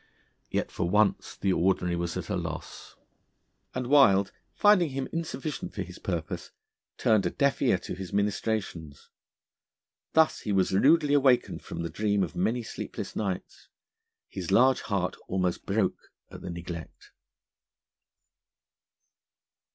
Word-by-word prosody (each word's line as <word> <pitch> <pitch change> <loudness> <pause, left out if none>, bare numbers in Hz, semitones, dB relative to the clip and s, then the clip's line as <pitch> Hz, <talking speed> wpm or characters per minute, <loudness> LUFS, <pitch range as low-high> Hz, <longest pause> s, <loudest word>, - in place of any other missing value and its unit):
Yet - - -2
for 85 - -2
once 105 +2 +1
the 95 -1 +1
Ordinary 90 -1 +1
was 85 0 -2
at - - -5
a - - -1
loss, - - -6 0.8
and 130 -1 -2
Wild, 110 -8 +5 0.2
finding 205 -6 +5
him 135 0 -3
insufficient 160 -3 -4
for 100 - -2
his 90 -1 -11
purpose, 85 -4 -4 0.5
turned 105 -5 +3
a - - 0
deaf 140 +6 +1
ear - - +4
to - - -7
his 95 -1 -7
ministrations. 100 -7 -2 1.0
Thus 160 -1 +4
he 105 - -4
was 95 -1 +2
rudely 145 - +4
awakened 135 -4 +3
from 85 - -6
the 85 - -3
dream 105 +2 +1
of 80 -5 -5
many 115 +7 0
sleepless - - -6
nights. 95 -3 -4 0.6
His 90 -4 -6
large 130 +5 +5
heart 95 -4 -1
almost 90 -2 -1
broke 100 0 -1 0.2
at - - -10
the - - -6
neglect. 85 -1 -8
100 Hz, 135 wpm, -28 LUFS, 90-130 Hz, 1.0 s, Wild